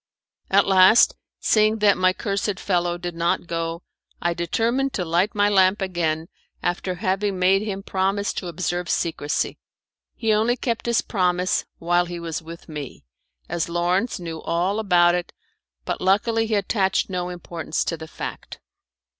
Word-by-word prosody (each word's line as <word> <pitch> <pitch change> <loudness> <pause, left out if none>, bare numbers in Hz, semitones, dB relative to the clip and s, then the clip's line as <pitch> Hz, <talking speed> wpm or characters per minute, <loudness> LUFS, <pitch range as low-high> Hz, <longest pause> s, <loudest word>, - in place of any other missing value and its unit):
At 200 +1 +4
last, 190 +3 +6 0.2
seeing 215 0 +3
that 205 -2 +4
my 185 0 +3
cursed 200 0 -2
fellow 175 -2 0
did 175 0 -5
not 170 +1 0
go, 165 0 -3 0.4
I 170 0 0
determined 230 +10 0
to 180 - -2
light 175 +6 +1
my 205 0 +3
lamp 190 -1 +4
again 170 -4 -1 0.4
after 180 +1 -1
having 195 0 -1
made 190 +2 +3
him 195 -2 -4
promise 195 +2 0
to 180 - -5
observe 175 0 -3
secrecy. 160 -2 -1 0.6
He 225 -2 +1
only 225 +4 +2
kept 235 -1 -2
his 235 -1 +2
promise 180 -2 0
while 175 +1 +2
he 175 0 -6
was 165 -2 -4
with 165 +1 -11
me, 150 - -8 0.4
as 170 0 -2
Lawrence 180 +7 0
knew 165 -2 -6
all 180 +5 0
about 175 -4 +4
it, 175 -1 -3 0.5
but - - -3
luckily 225 +4 +2
he 220 - 0
attached 195 -1 +1
no 180 -1 -2
importance 170 -2 -3
to 165 - -1
the 160 0 -9
fact. - - -7
185 Hz, 155 wpm, -23 LUFS, 170-205 Hz, 0.6 s, last